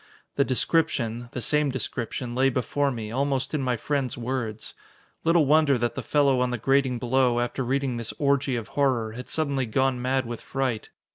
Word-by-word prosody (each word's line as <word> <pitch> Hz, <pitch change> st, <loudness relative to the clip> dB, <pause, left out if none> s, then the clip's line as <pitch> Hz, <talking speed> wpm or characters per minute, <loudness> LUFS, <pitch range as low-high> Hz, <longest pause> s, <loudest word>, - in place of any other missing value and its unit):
The 140 Hz, -, +4 dB
description 125 Hz, -4 st, 0 dB
the 125 Hz, -, -3 dB
same 150 Hz, +3 st, +2 dB
description 120 Hz, -1 st, -3 dB
lay 130 Hz, +2 st, +3 dB
before 140 Hz, +3 st, 0 dB
me, 110 Hz, -5 st, -5 dB
almost 135 Hz, +2 st, -1 dB
in 150 Hz, -, 0 dB
my 125 Hz, -2 st, 0 dB
friend's 135 Hz, 0 st, -2 dB
words. 120 Hz, -3 st, -4 dB, 0.5 s
Little 165 Hz, -1 st, +4 dB
wonder 150 Hz, -1 st, +4 dB
that 120 Hz, -1 st, -1 dB
the -, -, -4 dB
fellow 140 Hz, -3 st, +2 dB
on 125 Hz, -, +1 dB
the 125 Hz, -, -2 dB
grating 135 Hz, +1 st, +2 dB
below, 125 Hz, 0 st, +2 dB
after 120 Hz, +2 st, -1 dB
reading 130 Hz, 0 st, -1 dB
this 115 Hz, -1 st, -2 dB
orgy 140 Hz, -3 st, +1 dB
of 115 Hz, -3 st, -4 dB
horror, 130 Hz, -6 st, +1 dB
had 125 Hz, +3 st, -8 dB
suddenly 140 Hz, -5 st, -1 dB
gone 130 Hz, +2 st, +1 dB
mad 130 Hz, +1 st, 0 dB
with 120 Hz, 0 st, -6 dB
fright. 130 Hz, -5 st, -2 dB
130 Hz, 185 wpm, -26 LUFS, 120-140 Hz, 0.5 s, The